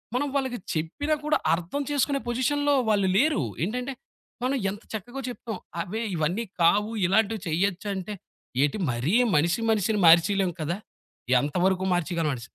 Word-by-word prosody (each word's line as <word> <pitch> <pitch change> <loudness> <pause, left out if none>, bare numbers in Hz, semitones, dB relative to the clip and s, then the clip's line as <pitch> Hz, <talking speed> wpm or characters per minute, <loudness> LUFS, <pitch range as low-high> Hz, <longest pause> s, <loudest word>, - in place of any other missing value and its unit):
మనం 285 +3 +1
వాళ్ళకి 260 -3 0 0.2
చెప్పినా 165 - -1
కూడా 305 0 +3 0.2
అర్థం 180 +12 -2
చేసుకునే 285 -1 +1
పొజిషన్‌లో 285 +4 +1 0.2
వాళ్ళు 200 -3 +3
లేరు. 285 - +3 0.2
ఏంటంటే 250 +8 -2 0.5
మనం 260 +2 +1
ఎంత 205 +2 -7
చక్కగో 240 +5 -5
చెప్పాం. 230 -3 -5 0.2
అవే 215 +7 -4
ఇవన్నీ 170 +8 0 0.2
కావు 205 +6 +4
ఇలాంటివి 220 +4 +2
చేయచ్చంటే 190 +3 -1 0.5
ఏంటి 145 +8 +2
మరీ 125 +8 -1 0.2
మనిషి 170 +7 +2
మనిషిని 215 0 +2
మార్చేయలేము 175 +3 +5
కదా! 160 +3 -1 0.6
ఎంత 145 +3 -3
వరుకు 190 0 +1
మార్చేయగలమని 165 -6 -1
200 Hz, 135 wpm, -26 LUFS, 170-245 Hz, 0.6 s, మార్చేయలేము